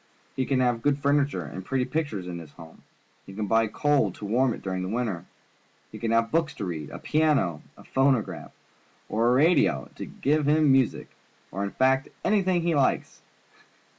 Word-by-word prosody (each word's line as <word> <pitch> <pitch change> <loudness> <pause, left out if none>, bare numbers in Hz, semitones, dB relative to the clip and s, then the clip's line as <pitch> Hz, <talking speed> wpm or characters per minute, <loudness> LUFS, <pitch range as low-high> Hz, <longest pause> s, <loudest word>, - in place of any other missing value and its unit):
He 130 - -1
can 135 -2 +1
have 120 -2 +1
good 145 +2 +2
furniture 140 -8 +1
and 95 +6 -7
pretty 130 +5 -1
pictures 140 - -3
in 90 -1 -6
his 80 -3 -12
home. 80 -1 -14 0.5
He 95 - -10
can 105 0 -2
buy 115 +2 +2
coal 140 -1 +1
to 105 - -9
warm 120 +5 +2
it - - -7
during 95 -1 -3
the 90 - -3
winter. 110 -6 -2 0.7
He - - -9
can 115 - -2
have 115 0 +2
books 165 -1 0
to 100 - -4
read, 80 -5 -5
a - - -8
piano, 145 - +1 0.2
a - - -14
phonograph, 115 - 0 0.6
or 115 +2 +2
a - - +4
radio 135 - +3
to - - -5
give 150 +1 0
him 150 -1 +4
music, 135 -3 +1 0.4
or, 100 +2 -3
in 100 - -2
fact, 130 +5 +2 0.2
anything 190 -3 +2
else - - -5
he 170 - +2
likes. 140 -3 0
125 Hz, 195 wpm, -26 LUFS, 95-145 Hz, 0.7 s, a